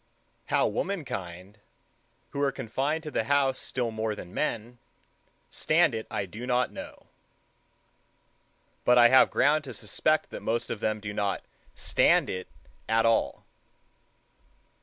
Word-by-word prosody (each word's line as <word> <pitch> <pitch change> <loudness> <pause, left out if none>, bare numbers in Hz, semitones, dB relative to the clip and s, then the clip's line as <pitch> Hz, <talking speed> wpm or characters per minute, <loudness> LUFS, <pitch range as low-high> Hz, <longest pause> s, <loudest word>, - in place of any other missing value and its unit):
How - - +2
womankind, 100 - -4 0.7
who 140 - -3
are 140 -1 +2
confined 135 +6 -2
to 150 - -6
the 110 - -1
house 135 0 +2
still 120 -3 -3
more 110 -1 -2
than 90 -3 -10
men, 120 +2 -3 0.7
stand 155 -3 +2
it 110 -1 -4
I 100 - -2
do 110 +7 -8
not 125 0 +1
know; - - -10 1.8
but 125 0 +5
I 120 -1 +8
have 130 - +6
ground 150 +1 +3
to 130 -4 -7
suspect 155 +10 0
that - - -7
most 115 +1 -2
of 110 - -3
them 110 0 -1
do 105 0 -5
not 100 -2 -1 0.3
stand - - +3
it 90 0 -5 0.4
at 115 0 +3
all. 115 0 +1
120 Hz, 140 wpm, -28 LUFS, 105-135 Hz, 1.8 s, I